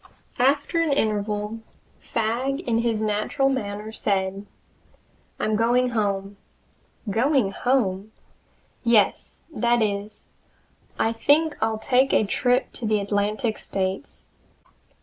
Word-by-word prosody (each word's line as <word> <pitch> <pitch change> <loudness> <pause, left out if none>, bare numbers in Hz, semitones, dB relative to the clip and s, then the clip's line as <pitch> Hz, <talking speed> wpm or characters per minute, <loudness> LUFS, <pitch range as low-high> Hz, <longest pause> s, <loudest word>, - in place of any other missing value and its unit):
After 285 +6 +2
an 325 -3 +1
interval 210 -3 -1 0.4
Fagg 245 +6 -1
in 230 -7 0
his 230 -2 0
natural 215 +6 +1
manner 210 -4 -3
said: 195 -1 -1 0.9
"I'm 215 - 0
going 240 +3 +2
home!" 200 -3 -2 0.7
"Going 250 -1 +2
home?" 215 -5 0 0.7
"Yes 230 -5 +2
that 240 -3 +2
is, 205 0 -4 0.7
I 225 - +1
think 295 +6 +3
I'll 220 0 +1
take 260 +4 +2
a - - +4
trip 245 +5 +1
to 230 - -2
the 215 -1 +2
Atlantic 205 +2 -1
States. 190 +6 -3
220 Hz, 110 wpm, -24 LUFS, 205-250 Hz, 0.9 s, a